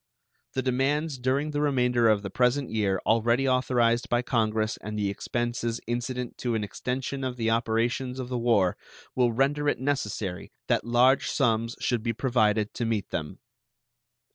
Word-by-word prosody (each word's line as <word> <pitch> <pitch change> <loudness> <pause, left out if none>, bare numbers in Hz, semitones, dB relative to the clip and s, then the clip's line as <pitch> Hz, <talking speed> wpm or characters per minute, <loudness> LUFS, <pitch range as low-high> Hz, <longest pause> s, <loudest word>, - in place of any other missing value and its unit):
The 130 - -1
demands 135 +3 0
during 135 +4 0
the 145 0 -1
remainder 125 -5 +3
of 105 -1 +2
the 100 - -5
present 125 +4 +1
year 100 -4 +1
already 115 +4 +2
authorized 125 -2 +2
by 120 +1 +1
Congress 110 -2 0
and 105 +1 -6
the 100 -1 0
expenses 120 +2 -2
incident 120 +1 -3
to 120 -2 -1
an 110 - -1
extension 130 +5 -4
of 130 -1 -2
the 115 -1 0
operations 115 +3 0
of 130 - -4
the 125 -1 -2
war 110 -6 +2 0.4
will 125 -2 +2
render 140 +4 +1
it - - 0
necessary 105 -9 -3
that - - +1
large 125 +3 +3
sums 115 -3 +1
should 120 -3 0
be 115 +1 -1
provided 110 -4 +1
to 120 - -3
meet 110 -4 -2
them. 80 +4 -4
120 Hz, 165 wpm, -27 LUFS, 110-130 Hz, 0.4 s, remainder